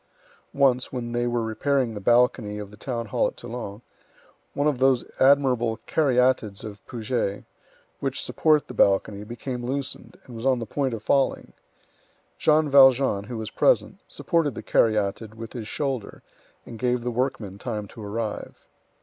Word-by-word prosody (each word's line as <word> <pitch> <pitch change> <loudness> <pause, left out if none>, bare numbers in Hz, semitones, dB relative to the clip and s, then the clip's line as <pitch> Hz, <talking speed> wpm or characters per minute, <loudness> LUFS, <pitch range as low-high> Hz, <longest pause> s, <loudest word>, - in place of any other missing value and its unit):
Once, 130 -3 +2
when 120 -2 -4
they 120 0 0
were 120 -1 0
repairing 125 +2 0
the 105 - -5
balcony 120 -1 +2
of 105 -1 -7
the - - -12
town 115 +2 -4
hall 105 - +1
at - - -8
Toulon, 115 -2 -7 0.7
one 145 - 0
of 145 -4 +1
those 130 -2 +3 0.2
admirable 130 -4 +4
caryatids 125 -8 +1
of 105 -2 -9
Puget, 115 -4 -2 0.6
which - - -2
support 155 -2 +2
the - - -8
balcony, 100 -1 +2
became 120 +3 -6
loosened, 135 +2 -5
and 125 - -11
was 115 - -7
on 130 -1 +3
the 115 - -4
point 130 +2 -1
of 110 - -9
falling. 135 +2 +1 0.9
Jean 155 0 +4
Valjean, 135 -6 +5
who 120 +1 -6
was 110 -1 -5
present, - - +2
supported 160 -7 0
the - - -7
caryatid 110 0 +1
with 115 0 -8
his 115 -4 -6
shoulder, 135 -6 -4 0.4
and 115 - -10
gave 125 0 0
the 125 - -2
workmen 115 -6 -2
time 105 -4 -4
to 110 - -10
arrive. 105 +1 -5
120 Hz, 160 wpm, -25 LUFS, 110-130 Hz, 0.9 s, Valjean